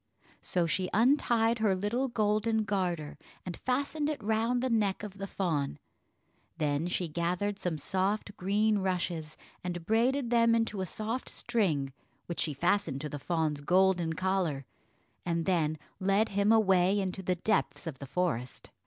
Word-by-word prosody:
So 175 -2 0
she 185 +2 0
untied 235 -1 +3
her 210 -3 +3
little 215 +8 0
golden 220 -1 +1
garter 175 -8 -2 0.3
and 180 -2 -4
fastened 285 +4 -1
it 290 -7 -4
round 225 +3 +1
the 260 - +1
neck 210 -3 +1
of 200 -1 -8
the 195 - -4
fawn; 155 - -1 0.8
then 150 +1 0
she 180 0 -1
gathered 175 +5 -1
some 175 -3 -2
soft 195 +6 -1
green 210 +3 +2
rushes, 175 -4 -2 0.3
and 175 -2 -4
braided 240 +4 +2
them 230 -1 +5
into 225 -4 0
a 185 - -2
soft 220 +7 -4
string, 155 - 0 0.3
which 170 - -5
she 150 - 0
fastened 165 -2 +1
to 150 - -4
the 145 - -5
fawn's 155 -1 -1
golden 180 0 +3
collar, 180 -6 -1 0.6
and 170 -1 -1
then 160 -4 +1 0.2
led 195 +3 +2
him 200 +2 +2
away 195 -3 +4
into 190 0 -2
the 185 -1 0
depths 200 +2 0
of 150 -5 -6
the 140 - -7
forest. 130 -7 -2
190 Hz, 155 wpm, -30 LUFS, 170-220 Hz, 0.8 s, them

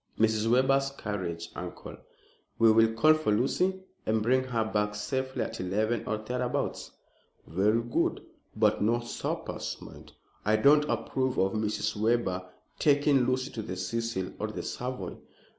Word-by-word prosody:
"Mrs. 110 0 +2
Webber's 135 +3 +3
carriage, 90 -5 -4
uncle. - - -7 0.6
We 115 -1 +6
will 115 0 +5
call 155 +8 +6
for 155 -8 0
Lucy 180 - +1 0.2
and 110 0 +1
bring 130 +3 +3
her 120 -3 0
back 105 -1 -1
safely 130 +5 -2
at - - -6
eleven 105 +5 -1
or 110 - 0
thereabouts." 125 +3 -2 0.6
"Very 105 +7 +2
good; 120 - -1 0.3
but - - +2
no 115 +3 +2
suppers, 120 - -4
mind. - - -12 0.3
I 105 +1 +3
don't 145 +7 +5
approve 130 -1 -1
of 95 0 +2
Mrs. 110 0 -1
Webber 105 -4 0 0.3
taking 145 -3 +4
Lucy 130 +1 0
to 110 - -4
the 100 -3 -5
Cecil 95 0 -2
or 105 - -1
the 110 - -5
Savoy." 125 +1 -5
115 Hz, 145 wpm, -29 LUFS, 105-130 Hz, 0.6 s, We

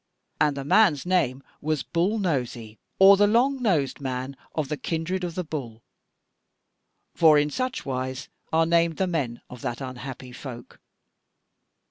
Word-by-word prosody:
And 150 -2 +2
the 140 - -3
man's 160 -1 +4
name 140 -8 +1 0.2
was 155 -2 -1
Bull 180 +6 0
Nosy, 125 - -2 0.2
or 195 +1 +8
the 205 +1 +5
longnosed 225 - +1
man 130 0 -4 0.2
of 155 -3 -1
the 150 - -2
kindred 165 +6 -3
of 170 -2 -4
the 180 - -2
Bull, 125 -8 -6 1.3
for 155 -3 +6
in 150 0 +2
such 255 - -3
wise 130 +1 -3 0.2
are 160 0 +3
named 170 -1 +2
the 190 - +1
men 140 -10 -2
of 125 -2 -11
that 120 - -3
unhappy 130 -1 -7
folk. 125 -1 -10
150 Hz, 145 wpm, -25 LUFS, 130-180 Hz, 1.3 s, or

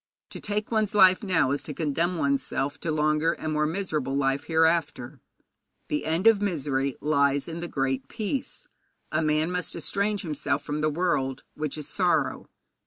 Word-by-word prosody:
To - - -7
take 210 +1 -3
one's 215 -2 0
life 185 -2 +6
now 170 - +2
is 145 - -1
to 150 - -7
condemn 165 +4 0
one's 140 -3 +1
self 145 +2 -2
to 160 - -2
longer 155 +1 +2
and 155 -1 -4
more 150 0 +1
miserable 155 -6 -2
life 135 0 0
hereafter. 160 -6 +1 0.7
The 150 - -1
end 165 +5 0
of 225 -3 +6
misery 140 -8 -1
lies 140 -2 +2
in 165 0 -5
the 175 - -4
Great 135 -2 -2
Peace. 230 +4 -4 0.5
A - - +1
man 155 +2 +1
must 180 0 -3
estrange 205 +1 -1
himself 150 -3 -2
from 150 0 -3
the 155 - +2
world, 145 -5 -1
which 155 -1 -4
is 150 - -3
sorrow. - - 0
155 Hz, 175 wpm, -26 LUFS, 140-180 Hz, 0.7 s, life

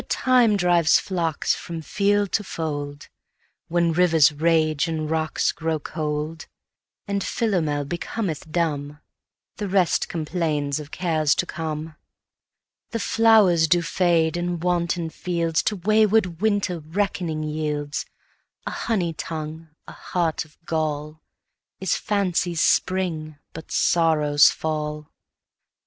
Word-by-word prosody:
Time 245 -5 +3
drives 175 -3 +4
the - - +5
flocks 170 -5 0
from 165 -2 -6
field 205 +4 +1
to 210 - 0
fold, 145 -5 -5 0.6
When 170 0 +1
rivers 165 -4 +5
rage 155 0 +1
and 160 -2 -2
rocks 160 0 0
grow 160 -1 -2
cold; 155 +1 -4 0.6
And 200 -1 -1
Philomel 160 - 0
becometh 170 0 -4
dumb; 150 -3 -2 0.6
The 205 - -3
rest 185 -3 +2
complains 155 -3 -1
of 150 -1 -9
cares 160 -4 +1
to - - 0
come. 160 -2 -5 0.9
The 230 - -3
flowers 210 -8 +4
do 175 +2 +3
fade, 170 -1 +1
and 175 -1 -3
wanton 175 -2 0
fields 170 -1 -1
To 210 - -1
wayward 210 -2 +2
winter 205 -5 +1
reckoning 160 -1 -2
yields: 150 -1 -3 0.6
A - - -3
honey 180 -7 -1
tongue, 160 0 -6 0.2
a - - -8
heart 165 -3 -2
of 155 - -24
gall, 155 -1 -3 0.6
Is 190 - 0
fancy's 180 -4 0
spring, 165 -5 0 0.2
but 160 - -9
sorrow's 150 -3 +4
fall. 150 -1 -4
165 Hz, 120 wpm, -23 LUFS, 155-180 Hz, 0.9 s, the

